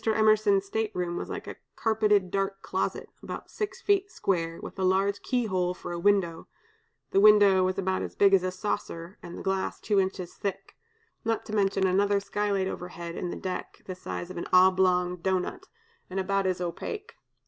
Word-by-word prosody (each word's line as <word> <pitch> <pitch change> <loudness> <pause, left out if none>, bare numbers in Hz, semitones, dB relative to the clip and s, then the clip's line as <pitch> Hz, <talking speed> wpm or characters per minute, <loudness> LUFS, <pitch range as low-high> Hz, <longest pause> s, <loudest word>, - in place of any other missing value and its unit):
Emerson's 215 -2 +3
state 220 +2 -1
room 175 -1 -2
was - - -4
like - - -5
a - - -8 0.2
carpeted 210 -4 +2
dark 195 0 -2
closet, - - -2
about - - -7
six 400 -3 -4
feet 400 -1 +2
square, 165 - -1
with - - -9
a - - 0
large 195 +2 +2
keyhole 190 -8 0
for - - -7
a 170 - -3
window 175 -3 +1 0.6
(the 195 - +4
window 205 -2 +7
was 185 +1 0
about 190 -1 0
as - - -5
big 200 -1 +5
as 195 - +6
a 185 - -1
saucer, 185 -2 -4
and 175 - -9
the - - -7
glass 190 0 -1
two 205 -2 +1
inches 185 -2 -2
thick), 195 -1 -5 0.5
not 225 0 -1
to 215 - -7
mention 195 -1 +2
another 200 +2 +3
skylight 200 -1 -1
overhead 175 -2 -6
in 180 - -3
the - - -4
deck, 185 -1 -5
of - - -36
the 185 - -5
size 180 -1 -6
of - - -8
an 170 - -4
oblong 185 -1 +4
doughnut, 190 - -2 0.4
and 190 +1 -3
about 195 0 +1
as 185 -1 0
opaque. 410 - -5
195 Hz, 190 wpm, -28 LUFS, 180-205 Hz, 0.6 s, window